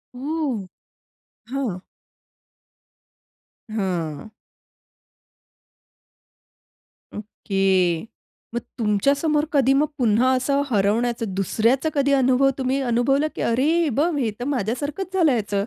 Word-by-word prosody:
ओह! 270 - -3 0.8
हां. 250 -8 -3 1.9
हं. 180 -5 -3 2.9
ओके, 195 -5 0 0.5
मग 240 - -1 0.2
तुमच्यासमोर 280 +8 +1
कधी 270 -2 +4
मग 295 +3 +2
पुन्हा 245 0 +3
असं 275 +2 +1
हरवण्याचं 225 +1 0
दुसऱ्याचं 230 - +1
कधी 280 -1 +1
अनुभव 265 0 +3
तुम्ही 265 0 0
अनुभवलं, 265 +4 +1
की - - -4
"अरे 240 +4 +1 0.2
हे 325 - +1
बघ! 295 +7 +1
हे 240 -6 0
तर 245 - -4
माझ्यासारखंच 285 - -3
झाल 350 -5 +3
ह्याच." 220 -6 -1
250 Hz, 95 wpm, -22 LUFS, 210-280 Hz, 2.9 s, कधी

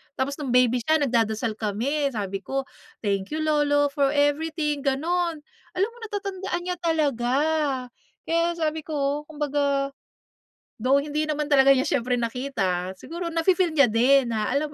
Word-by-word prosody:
Tapos 280 +3 -2
no'ng 285 - -4
baby 250 -1 +4
siya 315 +7 +2
nagdadasal 230 -5 0
kami, 250 +8 0
sabi 200 -6 -3
ko, 270 +7 -3 0.4
"Thank 200 +7 -1
you 315 - -1
lolo 290 -2 +2
for 280 -1 +2
everything", 300 +1 +1
gano'n. 315 +3 -1 0.3
Alam 390 +5 +1
mo, 480 - -19
natatandaan 390 -3 -4
niya 360 0 -3
talaga. 285 -7 0 0.9
Kaya 335 +1 +1
sabi 315 -1 -1
ko, 295 -1 -2
kumbaga, 285 -2 -1 0.9
though, 265 +3 +4
hindi 300 +2 -1
naman 300 0 -1
talaga 275 -1 +6
niya 270 +1 +5
siyempre 250 -4 0
nakita, 200 -7 -2
siguro 340 +1 -5
nafi-feel 345 +2 +2
niya 280 - +8
din, 240 +2 +3
na, 215 -1 -1
alam 290 +3 -1
285 Hz, 145 wpm, -25 LUFS, 250-315 Hz, 0.9 s, niya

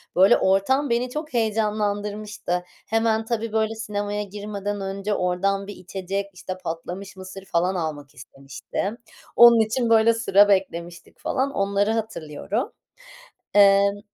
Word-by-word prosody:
Böyle, 190 +2 +6
ortam 245 +9 +2
beni 240 +2 0
çok 300 +1 -6
heyecanlandırmıştı. 210 -4 -1 0.2
Hemen, 225 0 +1
tabii, 230 -1 -2
böyle, 220 0 0
sinemaya 205 -1 -3
girmeden 205 0 -5
önce 195 +2 -3
oradan 195 +2 0
bir 205 - -7
içecek, 190 +2 -4
işte, 185 +1 -7
patlamış 175 +4 -6
mısır 190 +1 -10
falan 180 +2 0
almak 150 -4 -4
istemiştim. 135 0 -13 0.6
Onun 235 -1 +8
için, 230 +2 +1
böyle, 230 0 +5
sıra 205 -3 +4
beklemiştik 175 -3 -2
falan. 270 +2 -1
Onları 200 0 +1
hatırlıyorum, 220 - -3 0.8
emm 200 0 +5
205 Hz, 125 wpm, -23 LUFS, 190-220 Hz, 0.8 s, Onun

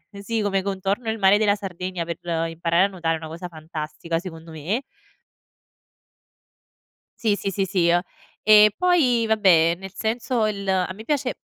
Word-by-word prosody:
ehm, 200 - -10
sì 225 +2 -2
come 195 -2 0
contorno 200 +4 -2
il 220 - -3
mare 195 +1 +5
della 210 -1 +2
Sardegna 185 -3 -5
per 170 -1 -5 0.3
imparare 170 +2 +1
a - - -5
nuotare 170 -4 -2
è - - -6
una 160 -1 -8
cosa 170 +3 -7
fantastica 160 0 -5
secondo 165 -2 -9
me 180 - -2 2.4
Sì, 215 -3 +2
sì, 200 - -3
sì, 195 +1 -1
sì. 175 -2 +2 0.4
E 215 -1 +7
poi 285 -11 +3
vabbè, 175 -6 +4
nel 195 0 -9
senso 225 +1 -1
il 200 -2 -4
a 185 -1 +1
me 220 +4 -11
piace 275 -3 -1
195 Hz, 160 wpm, -23 LUFS, 170-215 Hz, 2.4 s, E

